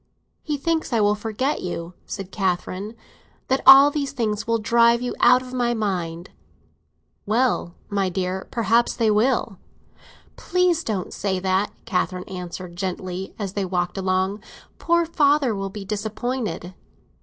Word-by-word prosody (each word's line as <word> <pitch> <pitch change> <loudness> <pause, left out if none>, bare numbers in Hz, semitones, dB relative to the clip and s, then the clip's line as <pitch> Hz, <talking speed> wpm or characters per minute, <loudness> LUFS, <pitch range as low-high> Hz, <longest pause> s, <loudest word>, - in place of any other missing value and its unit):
"He 300 -2 -2
thinks 320 +2 -1
I 230 - +2
will 205 0 +4
forget 225 +7 -2
you," 175 -1 -5
said 195 -1 -6
Catherine: 190 +2 -2 0.5
"that 265 +1 +2
all 275 +2 +10
these 280 -2 -3
things 220 -4 -2
will 230 0 +2
drive 235 +2 +4
you 245 0 -3
out 250 +1 +5
of 255 0 -10
my 240 -1 0
mind." 180 -5 -3 1.0
"Well, 220 -6 +1
my 200 -2 0
dear, 185 +1 -3
perhaps 230 +1 +2
they 225 -2 +2
will!" 220 -2 +1 0.8
"Please 360 -2 +1
don't 200 -5 -3
say 190 -2 -1
that," 190 +2 0
Catherine 185 -3 -1
answered 180 -1 -7
gently, 185 0 -4
as 195 -3 -4
they 200 - -1
walked 180 -1 -2
along. 190 +1 0 0.4
"Poor 340 0 +2
father 290 -6 +2
will 195 -1 -3
be 195 0 -8
disappointed." 215 -3 -3
210 Hz, 145 wpm, -23 LUFS, 185-245 Hz, 1.0 s, all